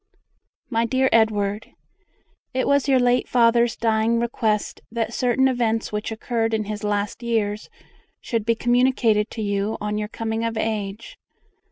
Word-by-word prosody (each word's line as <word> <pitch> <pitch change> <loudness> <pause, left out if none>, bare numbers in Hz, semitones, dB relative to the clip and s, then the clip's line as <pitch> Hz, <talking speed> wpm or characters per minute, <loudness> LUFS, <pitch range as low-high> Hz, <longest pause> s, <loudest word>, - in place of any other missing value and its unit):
MY 230 0 +1
DEAR 260 +2 +2
EDWARD, 210 -2 +1 0.8
It 260 - +1
was 280 0 +2
your 270 -2 +4
late 245 0 +2
father's 235 -1 +3
dying 225 0 +1
request 225 -3 -1
that 230 0 -2
certain 255 +2 +2
events 230 -3 0
which 210 +1 -3
occurred 225 0 -1
in 215 - -1
his 210 0 -6
last 205 +1 -2
years 215 -3 -1 0.5
should 230 -3 -2
be 230 +1 +1
communicated 240 -3 +2
to 220 - -5
you 205 +1 -1
on 210 0 -2
your 210 - -3
coming 225 +1 -3
of 230 -1 -2
age. 215 -1 -3
225 Hz, 150 wpm, -23 LUFS, 210-235 Hz, 0.8 s, your